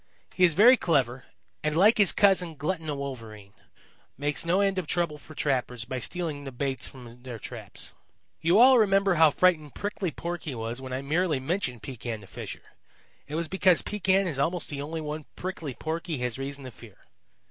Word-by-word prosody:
He 185 - +1
is 170 -3 +2
very 240 +7 +8
clever 130 - 0 0.4
and, 155 0 0
like 215 +6 +5
his 200 - +6
cousin, 185 -5 +3
Glutton 160 +2 -3
the 150 - -2
Wolverine, 115 -7 -7 0.6
makes 145 +1 0
no 170 +3 +2
end 195 -1 +2
of 175 - -5
trouble 170 -4 -1
for 155 +2 -14
trappers 125 -4 -1
by 130 +1 -4
stealing 160 0 -2
the 135 - -6
baits 130 0 -2
from 125 -2 -13
their 125 -2 -7
traps. - - -7 0.5
"You 170 +4 +4
all 255 +2 +8
remember 195 -2 +4
how 160 -2 +6
frightened 155 -2 +2
Prickly 205 -2 -2
Porky 170 -3 -5
was 115 +2 -4
when 130 -1 -7
I 130 +1 -3
merely 155 0 +1
mentioned 130 - -2
Pekan 120 -3 -5
the - - -12
Fisher. 95 - -8 0.6
It 150 - -5
was 165 0 -1
because 190 -1 +3
Pekan 195 -1 +1
is 150 -7 -2
almost 165 +5 0
the 140 -1 -4
only 160 +3 -4
one 150 0 -5
Prickly 165 -7 -5
Porky 160 +1 -3
has 125 0 -2
reason 140 +1 -5
to 130 - -8
fear. 110 -3 -15
150 Hz, 190 wpm, -27 LUFS, 130-180 Hz, 0.6 s, very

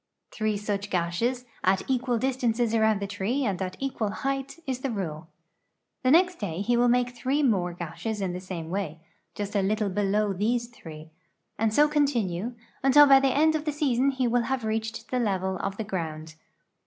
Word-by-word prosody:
Three 215 -2 -1
such 205 0 -3
gashes, 200 +9 -1 0.2
at 190 +1 +2
equal 255 -2 +1
distances 240 -2 0
around 220 -2 +3
the 200 - -2
tree 205 +7 -1
and 195 -4 -1
at 185 0 -4
equal 260 -6 -2
height, 270 +6 -3
is 260 -2 -2
the 270 - -2
rule. 170 -8 -4 0.7
The 255 - +2
nextda}^ 275 - +2
he 240 - +2
will 240 +1 +4
make 245 0 +3
three 265 +4 -1
more 190 -9 +2
gashes 180 +6 -5
in 190 -3 -2
the 180 - -4
same 175 -3 -6
way, 185 -5 -3 0.4
just 205 0 -4
a 200 - +3
little 210 +1 0
below 205 +1 +1
these 235 +5 0
three, 160 -8 -11 0.5
and 220 0 +2
so 295 +7 +5
continue, 240 - 0 0.3
until 280 +2 +7
by 275 -1 +7
the 270 - +2
end 305 +4 +3
of 310 -1 -2
the 305 - 0
season 275 -3 +1
he 260 -2 0
will 240 0 +1
have 265 -3 -1
reached 220 +1 -3
the 255 - +1
level 190 -4 0
of 195 +1 -4
the 220 - -2
ground. 160 -6 -5
220 Hz, 190 wpm, -27 LUFS, 190-255 Hz, 0.7 s, until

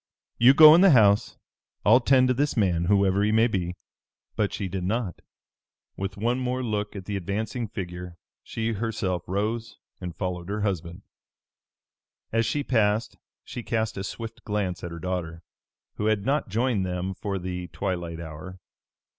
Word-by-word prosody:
You 125 +4 +7
go 155 0 +10
in 170 - +6
the 195 - +7
house. 100 -2 +3 0.5
I'll 115 +5 +7
tend 130 0 +4
to - - +4
this 140 +1 0
man, 90 -5 +2
whoever 100 0 +3
he 105 +1 +2
may 110 +1 +4
be." 90 -6 -2 0.6
But 105 -2 0
she 100 - -3
did 95 0 -4
not. 105 -1 -2 0.7
With 95 0 -5
one 120 +5 0
more 125 0 -2
look 105 -3 -2
at 95 -2 -7
the 105 - -3
advancing 105 +5 -3
figure, 90 -3 -7 0.2
she 115 0 -3
herself 105 -5 -2
rose 110 +5 -2 0.2
and 90 -1 -6
followed 90 -1 -4
her 105 +1 -2
husband. 95 -2 -3 1.3
As 115 -1 +1
she 145 +4 -1
passed 110 -3 +1 0.3
she 120 - -6
cast 110 -1 -2
a 95 - -4
swift 115 +2 -7
glance 100 -4 -2
at 85 - -4
her 85 - -7
daughter, 85 -1 -4 0.5
who 105 - -1
had 110 -2 +1
not 140 -3 0
joined 115 0 +1
them 90 +1 -3
for 100 +1 -4
the 90 -1 -5
twilight 85 -3 -4
hour. 85 +3 -9
100 Hz, 165 wpm, -26 LUFS, 90-115 Hz, 1.3 s, go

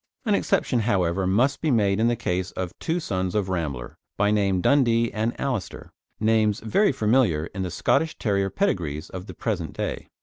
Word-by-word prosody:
An 215 - +2
exception, 195 -10 +1
however, 95 -4 +1
must 125 +9 +2
be 160 - +1
made 105 -5 +2
in 115 - +3
the 120 - +2
case 90 -3 -2
of 90 -2 -4
two 165 +2 -1
sons 95 - -2
of 100 -3 0
Rambler, 70 -9 -4 0.2
by 105 +2 +2
name 100 -3 +2
Dundee 115 0 +3
and 110 +2 -2
Alister, 125 -8 -4 0.3
names 110 -1 +2
very 150 - +2
familiar 110 - +2
in 95 - -4
the 95 - -2
Scottish 160 - +1
Terrier 100 -3 0
pedigrees 85 - -2
of 95 +1 -7
the - - -9
present 95 -8 -3
day. - - -4
105 Hz, 180 wpm, -24 LUFS, 95-120 Hz, 0.3 s, in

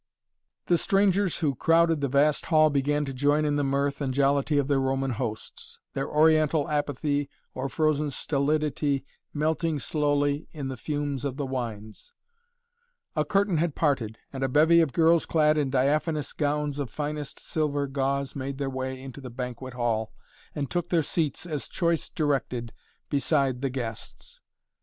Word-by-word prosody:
The 175 -2 +3
strangers 195 -1 +2
who 140 - +2
crowded 165 +2 +3
the 140 - +1
vast 145 +3 +2
hall 155 -2 +5
began 145 +1 +1
to 135 - -5
join 145 +3 +2
in 145 -1 +1
the 145 - +1
mirth 140 +1 0
and 130 -2 -1
jollity 140 +1 +2
of 140 -2 +2
their 140 -2 +2
Roman 135 0 0
hosts, 110 -1 -5 0.2
their 135 - -2
Oriental 155 -1 +3
apathy 145 -1 -1 0.2
or 130 +1 -3
frozen 150 -1 +1
stolidity 145 0 0 0.3
melting 155 +1 0
slowly 145 +1 0
in 140 -4 -4
the 130 - -4
fumes 145 0 -3
of 140 -2 -3
the 145 - -2
wines. 120 - -5 1.0
A - - +2
curtain 195 -3 +1
had 160 -1 0
parted 125 -8 0 0.2
and 135 0 -3
a 135 - +1
bevy 160 +5 +5
of 160 -4 +1
girls 165 +1 +3
clad 155 -1 +3
in 145 -3 +1
diaphanous 145 +3 +1
gowns 145 -1 -1
of 140 -4 -3
finest 150 +2 -4
silver 145 -2 -1
gauze 140 0 -1
made 135 0 -4
their 135 -1 -2
way 130 0 -4
into 135 +1 -9
the 130 - -7
banquet 125 +1 -6
hall 115 -3 -1 0.4
and 140 -2 -3
took 175 -1 -1
their 165 -3 +2
seats, 155 +1 -1
as 150 -5 -4
choice 170 -2 0
directed, 135 -6 -1 0.4
beside 135 -2 +1
the 135 - 0
guests. 120 -4 -7
145 Hz, 160 wpm, -27 LUFS, 135-155 Hz, 1.0 s, hall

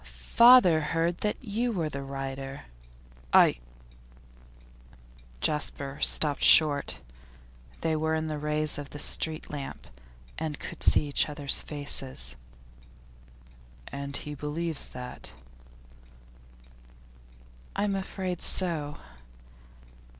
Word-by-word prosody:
'Father 160 - +5
heard 165 +3 -1
that 210 - -1
you 235 +2 -1
were 170 -7 -1
the 140 -2 -5
writer.' 135 - -6 0.7
'I?' - - +6 1.8
Jasper 145 -2 -2
stopped 150 -2 +3
short. 145 - +5 0.8
They 160 -1 0
were 160 +1 0
in 160 0 -2
the 155 -1 -4
rays 150 0 -1
of 145 0 -9
a - - -4
street 155 +1 0
lamp, 140 -2 -7 0.5
and 155 -3 -3
could - - -8
see 150 - +3
each 145 - +2
other's 145 -2 +1
faces. 135 - -3 1.5
'And 140 0 -4
he 150 - -6
believes 150 +2 -2
that?' 125 0 -8 2.4
'I'm 200 0 0
afraid 190 -2 -4
so. 155 -6 -3
150 Hz, 100 wpm, -28 LUFS, 140-165 Hz, 2.4 s, I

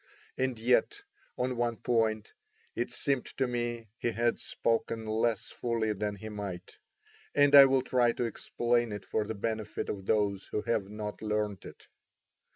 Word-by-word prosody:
And 130 -2 -1
yet, 125 - +2 0.3
on 125 0 -1
one 120 -1 0
point, 110 -3 0 0.4
it 120 - -2
seemed 135 -3 0
to 135 - +2
me 120 -2 -3
he - - 0
had 120 0 0
spoken 115 -1 -1
less 110 0 0
fully 115 -2 -1
than 105 0 -2
he 100 +2 -8
might; 100 -4 -7 0.6
and 145 0 +5
I 140 -1 +12
will 135 -1 +3
try 120 -2 +3
to - - -2
explain 120 0 0
it 100 -2 -6
for 105 +2 -1
the 110 - -3
benefit 110 0 -3
of 95 -1 -5
those 100 -3 +1
who 105 - -3
have 110 -4 -1
not 105 0 -6
learnt 105 -2 -2
it. - - -12
115 Hz, 165 wpm, -30 LUFS, 105-120 Hz, 0.6 s, I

